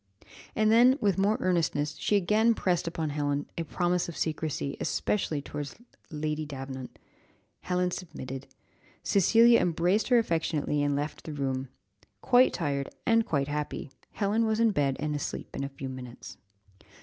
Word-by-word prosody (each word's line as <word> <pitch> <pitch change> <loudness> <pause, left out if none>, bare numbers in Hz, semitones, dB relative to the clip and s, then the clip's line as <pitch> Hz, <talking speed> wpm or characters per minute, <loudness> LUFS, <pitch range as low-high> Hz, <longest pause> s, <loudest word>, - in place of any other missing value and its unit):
And 215 0 +3
then, 245 +4 +6
with 200 -5 +1
more 205 +3 +3
earnestness, 160 -5 0
she 210 - +1
again 215 +4 +3
pressed 180 -4 0
upon 160 -3 -2
Helen 145 0 -1
a - - -2
promise 175 +2 0
of 170 - -8
secrecy, 155 -3 -2
especially 155 -8 -1
towards 145 -1 -6 0.3
Lady 155 -1 -2
Davenant. 135 -3 -7 0.6
Helen 180 0 0
submitted. 135 -7 -7 0.6
Cecilia 230 +5 +5
embraced 175 +5 +1
her 245 - +5
affectionately, 160 -7 0
and 145 0 +1
left 145 +2 -4
the 155 - -5
room. 135 -2 -2 0.5
Quite 250 0 +5
tired, 140 -5 -2 0.2
and 230 -1 +3
quite 140 -3 0
happy, 150 -1 -4 0.2
Helen 220 +2 +1
was 220 0 0
in 230 -1 +4
bed 140 -7 0
and 150 0 -2
asleep 145 - -5
in - - -3
a 140 - -3
few 135 -1 -7
minutes. 125 -2 -9
160 Hz, 150 wpm, -28 LUFS, 145-200 Hz, 0.6 s, then